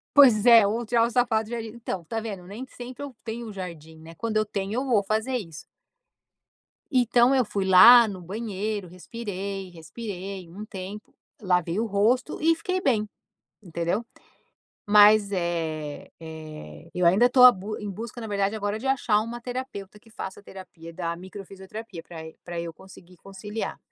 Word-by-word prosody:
Pois 245 Hz, -6 st, +7 dB
é, 230 Hz, -2 st, +8 dB
vou 220 Hz, +4 st, -1 dB
tirar 230 Hz, 0 st, +3 dB
o -, -, -5 dB
sapato 230 Hz, -3 st, +1 dB
no 240 Hz, -, -3 dB
jardim 225 Hz, -1 st, -5 dB
então 215 Hz, -6 st, -6 dB
tá 225 Hz, +7 st, -4 dB
vendo, 200 Hz, -5 st, -7 dB
nem 215 Hz, +7 st, -8 dB
sempre 245 Hz, +2 st, -10 dB
eu 275 Hz, -4 st, -8 dB
tenho 230 Hz, 0 st, -5 dB
um 210 Hz, -, -8 dB
jardim, 165 Hz, -4 st, -8 dB
né, 160 Hz, +1 st, -12 dB
quando 220 Hz, +3 st, -2 dB
eu 215 Hz, -, +2 dB
tenho 200 Hz, 0 st, -4 dB
eu 260 Hz, +3 st, -1 dB
vou 225 Hz, -6 st, +2 dB
fazer 220 Hz, +5 st, -1 dB
isso. 165 Hz, -8 st, -9 dB, 1.3 s
Então 245 Hz, 0 st, +4 dB
eu 255 Hz, -3 st, +3 dB
fui 200 Hz, -2 st, -2 dB
lá 230 Hz, +6 st, +9 dB
no 190 Hz, -3 st, -7 dB
banheiro, 205 Hz, +1 st, -4 dB
respirei, 195 Hz, 0 st, -6 dB
respirei 185 Hz, +1 st, -7 dB
um 205 Hz, +5 st, -8 dB
tempo, 200 Hz, +1 st, -9 dB, 0.3 s
lavei 180 Hz, -1 st, +1 dB
o 230 Hz, -, 0 dB
rosto 225 Hz, +7 st, +1 dB
e 330 Hz, +1 st, +4 dB
fiquei 370 Hz, +3 st, -2 dB
bem, 220 Hz, -, +1 dB, 0.5 s
entendeu? 175 Hz, +4 st, -2 dB, 0.8 s
Mas 210 Hz, 0 st, +6 dB
é 160 Hz, -5 st, -3 dB
é 155 Hz, -, -10 dB
eu 180 Hz, -, 0 dB
ainda 200 Hz, +9 st, +5 dB
tô 250 Hz, 0 st, +5 dB
a 250 Hz, -, +11 dB
busca 205 Hz, +2 st, -6 dB
em 210 Hz, -, -4 dB
busca 230 Hz, +5 st, -7 dB
na 225 Hz, -, -5 dB
verdade 200 Hz, 0 st, 0 dB
agora 205 Hz, 0 st, -2 dB
de 265 Hz, -, -4 dB
achar 245 Hz, -6 st, +2 dB
uma 230 Hz, +2 st, -6 dB
terapeuta 245 Hz, -5 st, -6 dB
que 225 Hz, +1 st, -22 dB
faça 190 Hz, -2 st, -8 dB
terapia 180 Hz, -4 st, -11 dB
da 170 Hz, -1 st, -3 dB
micro 190 Hz, +2 st, -10 dB
fisioterapia 195 Hz, -1 st, -9 dB
pra 170 Hz, -, -11 dB, 0.3 s
pra 175 Hz, -1 st, -5 dB
eu 170 Hz, -1 st, -5 dB
conseguir 180 Hz, 0 st, -16 dB
conciliar. 205 Hz, +4 st, -6 dB
205 Hz, 175 wpm, -25 LUFS, 180-230 Hz, 1.3 s, a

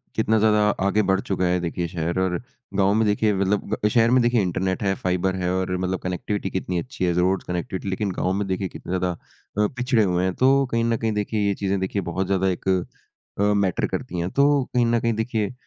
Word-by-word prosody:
कितना 110 Hz, 0 st, +2 dB
ज़्यादा 105 Hz, 0 st, +4 dB, 0.3 s
आगे 105 Hz, +2 st, +3 dB
बढ़ 95 Hz, 0 st, +3 dB
चुका 95 Hz, -2 st, -1 dB
है 90 Hz, 0 st, +2 dB
देखिए 85 Hz, 0 st, -2 dB
शहर 85 Hz, +1 st, -2 dB
और 95 Hz, -1 st, +1 dB, 0.4 s
गाँव 100 Hz, 0 st, +3 dB
में 110 Hz, +1 st, +2 dB
देखिए 105 Hz, +1 st, +2 dB
मतलब 100 Hz, +1 st, 0 dB
शहर 115 Hz, +1 st, +4 dB
में 130 Hz, -, +5 dB
देखिए 120 Hz, -1 st, +3 dB
इंटरनेट 95 Hz, +1 st, -1 dB
है, 95 Hz, -1 st, +2 dB
फाइबर 95 Hz, +1 st, -1 dB
है 90 Hz, -1 st, -1 dB
और 95 Hz, -1 st, -1 dB
मतलब 95 Hz, 0 st, -2 dB
कनेक्टिविटी 95 Hz, +2 st, -2 dB
कितनी 90 Hz, -1 st, -2 dB
अच्छी 125 Hz, -3 st, -3 dB
है, 90 Hz, -, +1 dB
रोड्स 90 Hz, +2 st, +1 dB
कनेक्टिविटी 90 Hz, +2 st, -3 dB
लेकिन 95 Hz, +1 st, -1 dB
गाँव 90 Hz, +1 st, -1 dB
में 100 Hz, 0 st, -1 dB
देखिए 95 Hz, 0 st, -1 dB
कितना 90 Hz, +1 st, -4 dB
ज़्यादा 90 Hz, 0 st, 0 dB, 0.5 s
अ, -, -, +3 dB
पिछड़े 125 Hz, -2 st, +2 dB
हुए 90 Hz, -2 st, +1 dB
हैं 95 Hz, -, 0 dB
तो 135 Hz, +1 st, +4 dB
कहीं 115 Hz, 0 st, +1 dB
न 115 Hz, -1 st, +1 dB
कहीं 110 Hz, -1 st, -1 dB
देखिए 105 Hz, 0 st, -1 dB
ये 100 Hz, -, +2 dB
चीज़ें 100 Hz, 0 st, -1 dB
देखिए 95 Hz, +2 st, -2 dB
बहुत 95 Hz, +3 st, -1 dB
ज़्यादा 95 Hz, 0 st, +1 dB
एक 90 Hz, -, -4 dB, 0.7 s
अ, -, -, +1 dB
मैटर 100 Hz, -3 st, +1 dB
करती 90 Hz, -, -4 dB
हैं। 85 Hz, +1 st, -1 dB
तो 140 Hz, 0 st, +3 dB
कहीं 120 Hz, -1 st, +3 dB
न 115 Hz, 0 st, +2 dB
कहीं 115 Hz, 0 st, 0 dB
देखिए 110 Hz, 0 st, -2 dB
95 Hz, 220 wpm, -23 LUFS, 90-110 Hz, 0.7 s, में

